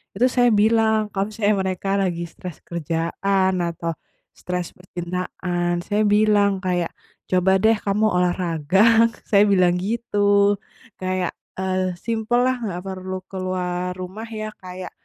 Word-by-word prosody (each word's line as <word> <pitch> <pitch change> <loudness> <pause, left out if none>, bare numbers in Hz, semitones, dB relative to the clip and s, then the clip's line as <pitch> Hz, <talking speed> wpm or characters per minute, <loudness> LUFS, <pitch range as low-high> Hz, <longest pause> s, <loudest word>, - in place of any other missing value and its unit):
Itu 250 - +3
saya 245 -1 +5
bilang 220 -1 +3
kalau 195 0 0
misalnya 210 -1 +1
mereka 190 +1 -3
lagi 170 -2 -1
stres 170 -1 -9
kerjaan 170 +4 0
atau 170 -1 -3 0.4
stres 180 -1 -3
percintaan, 175 -1 -3
saya 205 +1 +1
bilang 205 -1 +4
kayak, 180 -3 -1 0.4
“Coba 185 +1 +3
deh 220 0 +5
kamu 205 +1 0
olahraga.” 180 +5 +3 0.2
Saya 200 -2 +6
bilang 180 -3 +3
gitu. 205 -1 +2 0.4
Kayak, 185 -1 -1 0.2
eee, 185 -1 -1
simpellah, 240 +5 0
nggak 185 -6 -4
perlu 185 0 -5
keluar 180 -1 -3
rumah 185 +5 -7
ya, 215 -1 -5
kayak 185 0 -8
185 Hz, 125 wpm, -22 LUFS, 180-210 Hz, 0.4 s, Saya